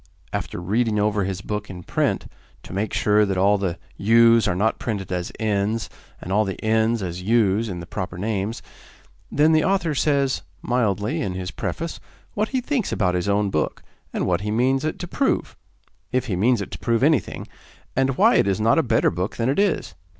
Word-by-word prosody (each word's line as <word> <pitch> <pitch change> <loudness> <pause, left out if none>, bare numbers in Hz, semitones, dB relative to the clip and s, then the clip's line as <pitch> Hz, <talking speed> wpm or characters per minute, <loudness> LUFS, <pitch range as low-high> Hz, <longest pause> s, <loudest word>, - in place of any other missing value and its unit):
After - - -3
reading 105 +5 0
over 105 -1 +1
his 95 0 -3
book 105 0 -4
in 90 -2 -8
print - - 0 0.4
to - - -10
make 100 +3 -1
sure 105 0 +3
that 100 -2 0
all 100 +2 +3
the 90 -3 -2 0.2
'u's' 115 +2 +5
are 90 - +1
not 110 +5 +1
printed 100 -6 -4
as 90 -1 -2
'n's,' 110 0 -1 0.3
and 95 - -5
all 105 +2 +4
the 95 -2 -4
'n's' 110 0 +2
as 90 0 -4
'u's' 110 +1 +2
in 90 -3 -5
the - - -7
proper 90 0 -5
names 105 +2 -2 0.7
then 150 +2 +4
the 155 -1 +4
author 185 -5 +1
says, 140 -2 +1 0.2
mildly, 110 -4 0
in 95 - -2
his 90 0 -4
preface, 165 0 -4 0.3
what 215 +1 -1
he 260 -1 0
thinks 255 -4 -1
about 90 -4 +1
his 90 +2 -1
own 100 0 +1
book, 75 - -1 0.3
and - - -1
what 85 -2 +1
he 105 - -3
means 130 +5 +2
it 155 - -2
to 175 - -6
prove 270 +9 0 0.6
if 130 -1 0
he 100 - -2
means 115 +4 +2
it - - -11
to - - -7
prove 115 0 +1
anything 150 -2 +1 0.5
and 135 0 +1
why 225 +5 +5
it - - +3
is 100 +1 +1
not 115 +8 +4
a - - +5
better 115 -5 +2
book 90 +4 -3
than 115 +2 0
it 140 - +1
is. 200 - +1
110 Hz, 205 wpm, -23 LUFS, 95-125 Hz, 0.7 s, u's